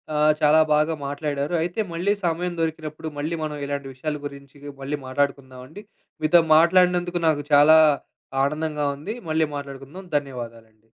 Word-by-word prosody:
ఆహ్, 150 +1 +4
చాలా 155 +1 +5
బాగా 155 +2 +2
మాట్లాడారు. 145 +1 -3
అయితే 175 +5 -3
మళ్ళీ 180 +5 0
సమయం 175 +1 -1
దొరికినప్పుడు 160 -1 -4
మళ్ళీ 155 +4 -2
మనం 150 -1 -3
ఇలాంటి 140 -1 -4
విషయాల 150 +3 -4
గురించి 140 0 -10 0.2
మళ్ళీ 145 +2 -3
మాట్లాడుకుందామండి. 135 +5 -4 0.4
మీతో 170 +3 +5 0.2
మాట్లాడినందుకు, 175 0 +3
నాకు 145 -2 +1
చాలా 150 +2 +7 0.7
ఆనందంగా 150 0 -1
ఉంది. 200 +10 -6
మళ్ళీ 155 0 +1
మాట్లాడుకుందాం. 140 +6 -8
ధన్యవాదాలండి. 115 -5 -8
150 Hz, 130 wpm, -23 LUFS, 140-160 Hz, 0.7 s, చాలా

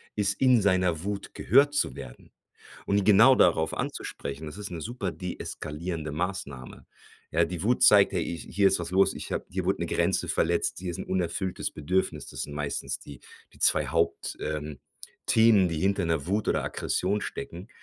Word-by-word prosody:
ist 100 -1 +1
in 125 -4 +5
seiner 90 -4 +1
Wut 100 0 -5
gehört 145 +1 +3
zu 145 - 0
werden - - -11 0.6
und 100 0 +1
genau 110 +6 +7
darauf 80 -6 +3
anzusprechen. 70 +3 -5
Das 75 - -8
ist 105 -1 -6
'ne 85 -2 -6
super 105 -2 -4
deeskalierende 80 -3 -5
Maßnahme, 75 -7 -5 0.4
ja. 85 +2 +3
Die 85 0 -5
Wut 120 +4 +1
zeigt 100 -1 +7
ja: - - +1
„Hi 85 0 -3
hier 100 +5 +2
ist 95 - +1
was 85 -1 -5
los, 95 +1 +3
ich - - -7
habe - - -2
hier - - -3
wurde - - 0
'ne - - -1
Grenze - - 0
verletzt, 85 +1 0
hier 90 -1 -4
ist - - -7
'n - - -5
unerfülltes 90 0 -2
Bedürfnis.“ 75 -2 -1
Das - - -5
sind 75 - -6
meistens 75 -1 -3
die 70 -4 -12 0.3
die - - -20
2 75 -2 +3
Haupt 85 +4 -1
ähm, 75 -2 -4 0.5
Themen, 110 -5 +5
die 80 -2 -3
hinter 100 -1 +1
'ner 80 -3 -1
Wut 100 +3 -1
oder - - +1
Aggression 100 +3 -1
stecken 85 +4 -7
90 Hz, 185 wpm, -27 LUFS, 80-100 Hz, 0.6 s, genau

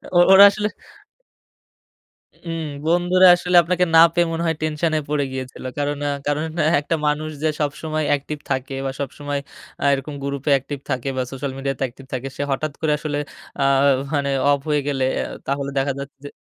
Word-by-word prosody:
ও - - +6
ওরা 195 +1 +10
আসলে 210 +1 -2 1.7
ওম 165 -2 -5 0.2
বন্ধুরা 175 +2 +4
আসলে 180 0 0
আপনাকে 180 +2 +1
না 160 - +8 0.2
পেয়ে 175 -1 +3
মনে 165 +1 -2
হয় 160 -1 0
টেনশন 155 +1 0
এ - - -1
পড়ে 150 -1 +1
গিয়েছিল। 130 -1 -7
কারণ 145 0 -1
এ্যাঁ 145 -1 -1
কারণ 145 +1 0 0.4
একটা 145 +3 -1
মানুষ 150 +1 -1
যে 160 - +2
সবসময় 155 +1 -2
অ্যাকটিভ 145 +1 -1
থাকে 135 0 -2
বা 135 - -1
সবসময় 145 +1 -4 0.4
এ্যাঁ 140 - +2
এরকম 140 +2 -5
গ্রুপে 140 +1 -2
অ্যাকটিভ 140 +1 -2
থাকে 130 0 -2
বা 130 - 0
সোশ্যাল 135 0 -4
মিডিয়া 135 0 -2
তে - - -5
অ্যাকটিভ 130 +2 -7
থাকে, 130 +1 -3
সে - - -3
হঠাৎ 155 +3 -2
করে 155 -2 +1
আসলে 150 -2 -3 0.4
এ্যাঁ 135 -1 +3 0.3
মানে 140 -1 0 0.2
অফ 140 - +2
হয়ে 150 -1 +2
গেলে 135 -2 0 0.2
এ - - 0 0.2
তাহলে 140 0 -2
দেখা 135 +1 +1
যাচ্ছে 140 +1 -8
যে - - -5
145 Hz, 185 wpm, -21 LUFS, 140-160 Hz, 1.7 s, ওরা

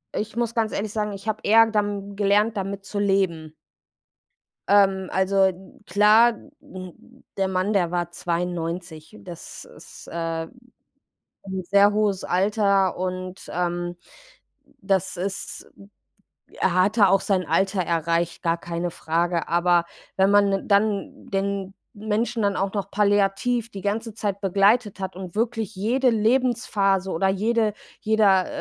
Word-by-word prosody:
Ich 215 +1 -4
muss 235 -1 -1
ganz 220 -2 0
ehrlich 205 0 -3
sagen, 210 -1 -2
ich 195 +1 -9
habe 220 0 -1
eher 225 +2 +6
dam 205 -2 -2
gelernt, 210 +2 +2
damit 195 0 -4
zu 205 0 -4
leben. 185 -6 0 1.2
Ähm, 195 -2 +3
also, 190 +1 +2
n 190 0 -2
klar, 210 +5 +5 0.3
n 185 +7 -12
der 195 -1 +1
Mann, 185 +2 -1
der 175 -3 +1
war 175 -1 -2
92. 170 0 -4
Das 175 -2 -10
ist, - - -14
äh, 165 -1 -3 1.0
'n 190 -1 -4
sehr 200 +3 +4
hohes 205 -3 0
Alter 195 0 +1
und, 185 0 -5
ähm, 175 0 -2 0.9
das 190 -1 0
ist 190 +2 -5 0.9
er 180 - +2
hatte 200 +3 +4
auch 195 +1 +4
sein 190 -2 0
Alter 190 +4 +1
erreicht, 170 +1 -1
gar 165 -1 +1
keine 170 +1 -4
Frage. 170 +1 -1
Aber 175 0 +3 0.3
wenn 190 +1 +3
man 205 0 +5
'nen 195 +1 -2
dann 200 0 0
den 195 0 -2 0.2
Menschen 215 +2 -2
dann 200 -1 +1
auch 195 0 -1
noch 200 -1 -4
palliativ 205 +3 +1
die 195 - -7
ganze 215 +2 -3
Zeit 205 -3 -3
begleitet 200 +2 +2
hat 190 -1 -5
und 185 -2 -8
wirklich 225 -1 -2
jede 245 +6 +1
Lebensphase 215 -5 +1
oder 190 +4 +1
jede 215 +2 +1 0.3
jeder, 205 -4 +3
195 Hz, 140 wpm, -23 LUFS, 180-210 Hz, 1.2 s, eher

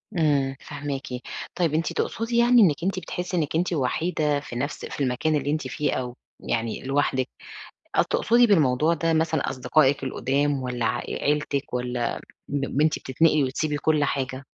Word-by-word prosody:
إمم، 140 -5 +2
فاهماكِ. 140 -2 -5 0.5
طيب 170 -4 +1
أنتِ 160 +1 0
تقصدي 230 +1 -1
يعني 240 0 +6
إنِك 165 -5 +3
أنتِ 190 0 0
بتحسي 180 +1 -4
إنِك 155 -1 -1
أنتِ 175 +1 +1
وحيدة 150 +1 0
في 130 -4 -9
نَفْس 145 +4 -3
في - - -7
المكان 130 +5 +1
اللي 145 0 0
أنتِ 155 -3 -2
فيه 135 +3 -1
أو 125 -1 -3 0.2
يعني 115 -1 -2
لوحدِك، 135 -1 0 0.7
آه - - +5
تقصدي 240 +1 +3
بالموضوع 155 -4 +3
ده 165 0 0
مثلًا 160 -1 +1
أصدقائِك 135 +1 +2
القُدام 140 +1 0
والّا 125 -2 -2
ع 110 +2 +1
عيلتك 145 -2 -1
والّا 125 -1 -2 0.3
ب 140 0 -1
أنتِ 155 0 +2
بتنتقلي 150 +2 +2
وتسيبي 145 +3 -1
كل 150 0 +2
حاجة؟ 135 -1 -2
145 Hz, 160 wpm, -25 LUFS, 130-160 Hz, 0.7 s, يعني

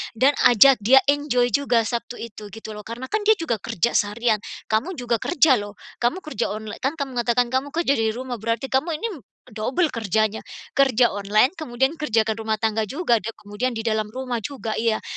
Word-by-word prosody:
dan 265 +5 +4 0.2
ajak 250 +2 +6
dia 255 +6 +6
enjoy 280 -4 +2
juga 245 -2 +2
Sabtu 235 +1 -4
itu, 215 -2 -8
gitu 220 0 -8
loh. 210 0 -9
Karena 235 +3 -6
kan 430 - +1
dia 435 - +7
juga 315 - -2
kerja 215 +5 -1
seharian, 215 +1 +1 0.3
kamu 250 +13 0
juga 240 -4 -1
kerja 305 -6 +3
lho, 205 0 -8 0.2
kamu 245 +11 0
kerja 240 -7 -2
online, 215 -1 -7
kan 275 +4 -1
kamu 270 -5 -4
mengatakan 240 +1 +2
kamu 260 +2 0
kerja 330 -4 +2
dari 220 0 0
rumah, 250 -1 -5
berarti 230 +5 -2
kamu 310 +5 +1
ini, 460 - 0 0.4
double 255 - 0
kerjanya. 220 -1 0 0.4
Kerja 255 -4 +4
online, 205 +5 +2
kemudian 265 -2 0
kerjakan 225 -6 +1
rumah 220 - +2
tangga 220 -1 0
juga, 255 - +1
dan 225 +2 -6
kemudian 210 +5 -4
di 225 - -4
dalam 215 -2 0
rumah 255 -2 -3
juga, 225 -2 -5
iya. 225 -1 0
235 Hz, 190 wpm, -23 LUFS, 220-265 Hz, 0.4 s, dia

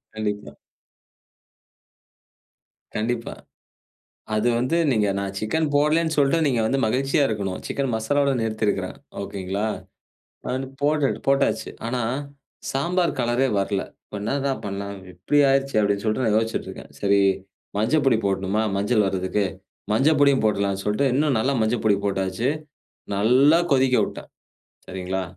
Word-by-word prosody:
கண்டிப்பா. 105 -1 -3 2.4
கண்டிப்பா. 115 +2 -2 1.0
அது 110 +3 +2
வந்து 130 +7 0 0.2
நீங்க 105 -3 +2
"நான் 100 0 -3
சிக்கன் 155 +9 0
போடலன்னு" 155 +3 +2
சொல்ட்டு, 140 +4 +4
நீங்க 125 -5 +1
வந்து 135 +4 +1
மகிழ்ச்சியா 135 +5 +1
இருக்கணும். 100 -4 -3
சிக்கன் 135 -2 -2
மசாலாவோடு 140 +4 +1
நிறுத்தியிருக்கிறேன் 110 -1 -1 0.3
ஓகேங்களா! 100 +2 -3 0.8
அது - - -3
வந்து 130 0 -4
போட்டு 145 -1 +2 0.2
போட்டாச்சு. 135 -5 +1 0.2
ஆனா, 125 +1 -1 0.7
சாம்பார் 170 +5 0
கலரே 120 +3 +1
வரல. 100 0 0 0.2
இப்போ - - -9
"என்னடா 140 +5 0
பண்ணலாம்? 100 0 -5 0.2
இப்டி 100 +12 0
ஆயிடுச்சே!" 135 -3 +1
அப்டின்னு 100 0 0
சொல்லிட்டு 110 +4 0
நான் 105 - +3
யோசிச்சிட்டு 115 0 -2
இருக்கேன். - - -10
சரி, 100 0 +3 0.6
"மஞ்ச 110 +8 +1
பொடி 115 -4 +4
போடணுமா? 95 +2 0
மஞ்சள் 105 +1 +2
வர்றதுக்கு, 95 +2 0 0.5
மஞ்ச 135 +7 +3
பொடியும் 140 -4 +4
போடலாம்ன்னு" 100 -2 0
சொல்லிட்டு 105 +7 +1
இன்னும் 145 -1 +2
நல்லா 135 +5 +1
மஞ்ச 110 +3 +1
பொடி 105 -2 +4
போட்டாச்சு, 95 +4 -1 0.7
நல்லா 130 +10 +5
கொதிக்க 130 -1 +4
விட்டேன் - - -8 0.6
சரிங்களா? 95 0 -3
110 Hz, 130 wpm, -23 LUFS, 100-135 Hz, 2.4 s, நல்லா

